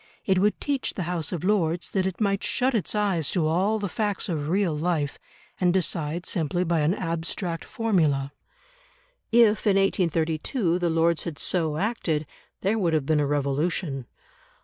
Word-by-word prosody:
It 190 -2 +3
would 210 +2 +2
teach 280 -2 -2
the 185 - -2
House 170 -2 -3
of 175 -3 -4
Lords 180 -4 +1
that 190 -1 +1
it 190 - -5
might 200 -2 +1
shut 260 +1 +1
its 215 -2 0
eyes 195 -8 +1
to 175 -5 +1
all 185 +7 +2
the 205 -1 -2
facts 205 0 -1
of 150 -3 -2
real 185 -3 +1
life 150 -3 -1 0.4
and 180 -1 +3
decide 175 -2 -1
simply 175 0 0
by 170 -2 +1
an 155 +5 +2
abstract 165 0 -3
formula. 155 -11 0 1.0
If 225 -2 +4
in 200 - +4
1832 170 - +1
the 175 -1 +1
Lords 165 0 +2
had 165 -4 -5
so 160 -4 0
acted, 170 -6 -1 0.4
there 210 +4 +1
would 170 -5 +1
have 155 -3 +1
been 155 +1 +2
a 145 - +1
revolution. 145 -1 -1
175 Hz, 170 wpm, -25 LUFS, 155-195 Hz, 1.0 s, If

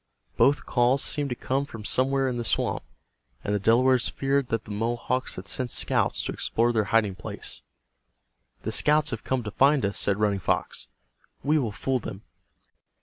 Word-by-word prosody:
Both 145 +2 +3
calls 125 +2 +2
seemed 145 -1 0
to 125 - -2
come 135 +3 -1
from 115 -7 -9
somewhere 135 +2 +1
in 125 -2 -2
the 120 - -2
swamp, 115 - 0 0.6
and 105 - -1
the 105 - +1
Delawares 125 +4 +3
feared 135 -1 0
that 115 -3 -2
the - - -9
Mohawks 120 +4 -1
had 95 +2 -8
sent 125 +4 -2
scouts - - 0
to - - -3
explore 120 +1 0
their 110 -2 +2
hiding 105 -1 +2
place. 90 - -6 1.0
"The - - -2
scouts 150 0 +3
have - - -4
come 130 -2 -1
to 105 - -5
find 140 +1 +4
us," 100 - -1
said 100 -1 +1
Running 105 -2 +1
Fox. - - -2 0.6
"We 150 +3 +3
will 120 -6 -1
fool 130 +5 -1
them." 100 -2 -8
120 Hz, 180 wpm, -26 LUFS, 105-135 Hz, 1.0 s, find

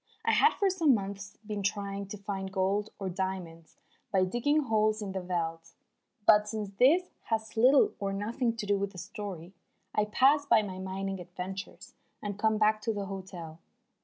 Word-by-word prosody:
I - - +4
had 445 - +5
for 395 -2 +2
some 325 -8 +4
months 200 0 -5
been 210 -1 -3
trying 200 0 -2
to 210 - -7
find 195 -1 -4
gold 195 +2 0
or 195 - -4
diamonds 180 -3 -5 0.3
by 190 -2 +3
digging 290 +10 +1
holes 215 -3 +2
in 205 -3 -4
the 190 0 -3
veldt. 165 -2 -3 0.5
But 210 -1 +6
since 210 -2 -4
this 340 +9 +5
has 220 -1 -2
little 255 +5 +5
or 200 -1 -1
nothing 230 +4 -1
to 220 - -3
do 200 -1 +1
with 200 0 -2
the - - -12
story, 190 -2 -7 0.4
I 210 - +2
pass 270 +7 +4
by 220 -5 +5
my 185 -2 -6
mining 190 0 -4
adventures 180 +2 -7 0.3
and 205 -1 -5
come 220 0 +2
back 215 0 +3
to 225 +1 -1
the 200 -1 -3
hotel. 185 -4 -8
200 Hz, 180 wpm, -30 LUFS, 190-220 Hz, 0.5 s, But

